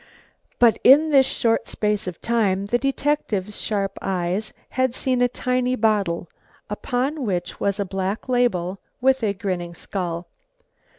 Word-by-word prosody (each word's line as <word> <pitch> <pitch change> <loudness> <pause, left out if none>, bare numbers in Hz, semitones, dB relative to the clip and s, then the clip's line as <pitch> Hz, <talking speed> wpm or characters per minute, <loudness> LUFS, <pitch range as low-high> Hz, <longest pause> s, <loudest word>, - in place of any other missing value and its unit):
But 235 -2 +5
in 300 +4 +7
this 270 -2 +6
short 230 -1 0
space 210 -2 -1
of 180 -3 -5
time 205 -5 +1
the 240 +4 +1
detective's 265 -7 -1
sharp 200 -2 -2
eyes 185 +3 -1 0.2
had 260 -1 0
seen 255 -2 0
a 245 - +5
tiny 250 0 0
bottle 205 -7 +1 0.4
upon 260 +7 -1
which 180 -6 -2
was 200 0 0
a 200 - 0
black 190 +4 -3
label 200 -7 +1 0.2
with 265 +1 +3
a 205 -3 0
grinning 180 -4 -3
skull. 175 -2 -4
210 Hz, 140 wpm, -23 LUFS, 190-250 Hz, 0.4 s, in